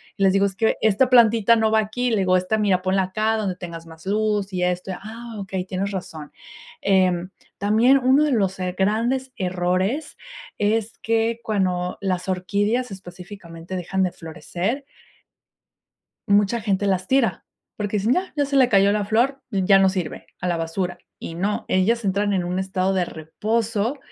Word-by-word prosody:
Y 195 Hz, -, -9 dB
les 190 Hz, -1 st, +5 dB
digo 195 Hz, 0 st, +3 dB
es 195 Hz, -1 st, -3 dB
que 220 Hz, +3 st, +1 dB
esta 220 Hz, +4 st, +3 dB
plantita 230 Hz, -2 st, +5 dB
no 220 Hz, -1 st, +2 dB
va 220 Hz, -, +4 dB
aquí, 235 Hz, +3 st, -1 dB
le 220 Hz, -, +2 dB
digo, 185 Hz, -2 st, +3 dB
esta 185 Hz, +4 st, 0 dB
mira, 190 Hz, -3 st, +2 dB
ponla 190 Hz, +1 st, +2 dB
acá 215 Hz, +4 st, 0 dB
donde 200 Hz, -4 st, -2 dB
tengas 170 Hz, -2 st, -8 dB
más 160 Hz, +1 st, -14 dB
luz 205 Hz, -1 st, 0 dB
y 180 Hz, -, -2 dB
esto, 180 Hz, +1 st, -1 dB
ah, 225 Hz, +4 st, -9 dB
okey, 190 Hz, -2 st, -4 dB
tienes 190 Hz, +1 st, -3 dB
razón. 160 Hz, -6 st, -7 dB, 0.5 s
Em, 185 Hz, -2 st, +2 dB, 0.3 s
también 220 Hz, +7 st, +4 dB
uno 265 Hz, +3 st, +4 dB
de 300 Hz, -, +1 dB
los, 195 Hz, -4 st, 0 dB
eh, 180 Hz, -1 st, -3 dB
grandes 235 Hz, +7 st, 0 dB
errores, 185 Hz, -, -1 dB, 0.4 s
es 215 Hz, +1 st, 0 dB
que 225 Hz, +1 st, 0 dB
cuando 180 Hz, -4 st, -1 dB
las 185 Hz, -2 st, -2 dB
orquídeas, 205 Hz, +6 st, 0 dB
específicamente, 180 Hz, -2 st, -9 dB
dejan 190 Hz, +1 st, -1 dB
de 180 Hz, -, 0 dB
florecer. 175 Hz, -, -4 dB, 1.4 s
Mucha 205 Hz, +3 st, +3 dB
gente 200 Hz, -1 st, 0 dB
las 185 Hz, -1 st, 0 dB
tira, 260 Hz, -1 st, +1 dB, 0.3 s
porque 210 Hz, 0 st, -2 dB
dicen 220 Hz, +6 st, +2 dB
ya 370 Hz, +1 st, -2 dB
ya 290 Hz, -2 st, +1 dB
se 280 Hz, 0 st, -1 dB
le 260 Hz, -2 st, +5 dB
cayó 200 Hz, -1 st, +4 dB
la 210 Hz, -1 st, 0 dB
flor, 245 Hz, +6 st, +1 dB
ya 195 Hz, -2 st, +4 dB
no 190 Hz, 0 st, +4 dB
sirve 185 Hz, -4 st, -4 dB
a 180 Hz, -, -2 dB
la 175 Hz, -, 0 dB
basura. 175 Hz, +2 st, -3 dB, 0.2 s
Y 165 Hz, -, -7 dB
no, 200 Hz, +5 st, -2 dB
ellas 220 Hz, +5 st, +2 dB
entran 200 Hz, +1 st, +1 dB
en 185 Hz, -3 st, 0 dB
un 180 Hz, +1 st, -2 dB
estado 190 Hz, 0 st, 0 dB
de 185 Hz, -2 st, +1 dB
reposo, 215 Hz, -, -2 dB
200 Hz, 175 wpm, -22 LUFS, 185-220 Hz, 1.4 s, les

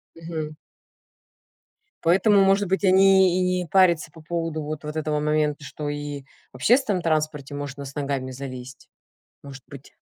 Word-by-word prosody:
Мгм. 160 Hz, -2 st, -6 dB, 1.5 s
Поэтому, 195 Hz, +4 st, +4 dB
может 195 Hz, 0 st, +3 dB
быть, 190 Hz, +2 st, -1 dB
они 190 Hz, -1 st, +5 dB
и -, -, +1 dB, 0.2 s
не 175 Hz, -, -6 dB
парятся 170 Hz, -4 st, +3 dB
по 160 Hz, -, -14 dB
поводу 165 Hz, -1 st, -3 dB
вот 150 Hz, 0 st, -6 dB
вот 150 Hz, +1 st, -6 dB
этого 155 Hz, -1 st, -1 dB
момента, 150 Hz, -1 st, 0 dB
что 145 Hz, +2 st, -6 dB
и 145 Hz, -1 st, -5 dB, 0.3 s
в -, -, -20 dB
общественном 210 Hz, -, +2 dB
транспорте 155 Hz, -3 st, -1 dB
можно 145 Hz, 0 st, -6 dB
с 135 Hz, -, -10 dB
ногами 140 Hz, -2 st, -3 dB
залезть. 130 Hz, 0 st, -9 dB, 0.5 s
Может 135 Hz, -2 st, -11 dB
быть. 140 Hz, -1 st, -13 dB
155 Hz, 150 wpm, -24 LUFS, 145-175 Hz, 1.5 s, они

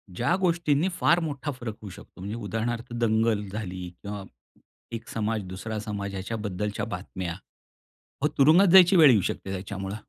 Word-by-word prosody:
ज्या 125 Hz, -, +1 dB
गोष्टींनी 170 Hz, -2 st, +2 dB
फार 170 Hz, -, +4 dB
मोठा 145 Hz, -3 st, -3 dB
फरक 120 Hz, -5 st, -6 dB
होऊ 105 Hz, -, -8 dB
शकतो. 90 Hz, -, -14 dB
म्हणजे 100 Hz, +3 st, -4 dB
उदाहरणार्थ 115 Hz, +3 st, -3 dB
दंगल 110 Hz, -2 st, +1 dB
झाली 95 Hz, -3 st, -5 dB
किंवा 100 Hz, +4 st, -8 dB
अ, -, -, -8 dB, 0.7 s
एक 115 Hz, 0 st, -8 dB
समाज, 110 Hz, -1 st, -2 dB
दुसरा 105 Hz, +4 st, -5 dB
समाज 100 Hz, -2 st, -4 dB
याच्याबद्दलच्या 105 Hz, 0 st, -3 dB
बातम्या. 90 Hz, -3 st, -5 dB, 0.9 s
अहो 150 Hz, -, +3 dB
तुरुंगात 160 Hz, +8 st, +6 dB
जायची 190 Hz, 0 st, +8 dB
वेळ 155 Hz, -5 st, +8 dB
येऊ 105 Hz, -5 st, +4 dB
शकते 95 Hz, -, -3 dB
त्याच्यामुळे. 95 Hz, +1 st, -5 dB
110 Hz, 155 wpm, -26 LUFS, 100-135 Hz, 0.9 s, जायची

